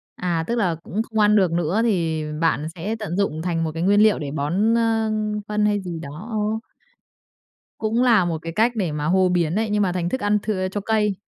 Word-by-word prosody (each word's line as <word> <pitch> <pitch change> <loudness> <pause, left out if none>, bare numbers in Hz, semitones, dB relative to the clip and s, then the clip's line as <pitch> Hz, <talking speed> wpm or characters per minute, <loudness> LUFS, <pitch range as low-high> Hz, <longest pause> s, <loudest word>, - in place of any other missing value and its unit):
À, 170 -2 -1
tức 235 - 0
là 185 -8 +1
cũng 215 +4 -2
không 220 -1 -4
ăn 210 0 +5
được 185 -5 +3
nữa 175 +6 0
thì 165 -8 0 0.2
bạn 155 -2 +1
sẽ 200 +6 -3
tận 185 -4 -4
dụng 160 -6 0
thành 165 -2 -1
một 160 - -2
cái 165 +2 -4
nguyên 205 +2 +4
liệu 215 -1 +4
để 140 -2 -4
bón, 185 +11 +1
a, 225 -1 +1 0.4
phân 210 0 0
hay 205 -1 +1
gì 175 -3 -6
đó. 155 +8 -8
Ờ. 215 +1 -1 1.2
Cũng 225 +2 0
là 225 -7 +4
một 165 -2 -1
cái 165 0 -6
cách 235 +4 +2
để 185 -8 -1
mà 150 0 -3
hô 185 +2 +3
biến 175 -1 +1
đấy, 220 +1 0
nhưng 210 0 +2
mà 185 - +1
thành 175 -1 -2
thức 260 - -3
ăn 205 0 +2
thừa 185 -4 -1
cho 205 - -3
cây. 210 -2 +1
190 Hz, 235 wpm, -22 LUFS, 165-215 Hz, 1.2 s, ăn